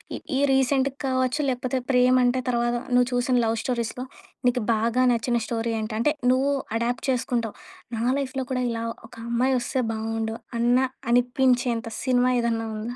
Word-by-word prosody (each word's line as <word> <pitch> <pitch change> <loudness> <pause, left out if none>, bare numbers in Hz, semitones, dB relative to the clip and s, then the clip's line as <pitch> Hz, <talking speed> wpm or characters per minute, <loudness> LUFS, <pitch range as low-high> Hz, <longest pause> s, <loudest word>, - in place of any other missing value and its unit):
ఈ - - -4 0.2
ఈ - - +1
రీసెంట్‌గా 265 0 +2
కావచ్చు, 260 +2 0
లేకపోతే 255 +1 -1
ప్రేమంటే 250 0 +4
తర్వాత 240 0 +1 0.2
నువ్వు 245 0 +4
చూసిన 245 +1 +1
లవ్ 225 +1 0
స్టోరీస్‌లో 245 0 -2 0.4
నీకు 245 -2 +1
బాగా 230 +3 +1
నచ్చిన 235 +1 0
స్టోరీ 230 0 -2
ఏంటి? 215 0 -4
అంటే 295 +6 +2 0.2
నువ్వు 275 +2 +2 0.2
అడాప్ట్ 235 +1 -2
చేసుకుంటావు. 240 -3 -1 0.4
"నా 225 - -2 0.2
లైఫ్‌లో 265 -1 -3
కూడా 250 -1 0
ఇలా 230 0 -3 0.3
ఒక - - -15
అమ్మాయి 255 +3 +2
వస్తే 260 +1 -1
బాగుండు." 225 0 -3 0.2
అన్న 240 +1 +4 0.3
అనిపించేంత 245 -1 +2 0.2
సినిమా 255 -1 +3
ఏదన్నా 230 -1 -1
ఉందా? 235 +3 -5
245 Hz, 155 wpm, -25 LUFS, 235-255 Hz, 0.4 s, ప్రేమంటే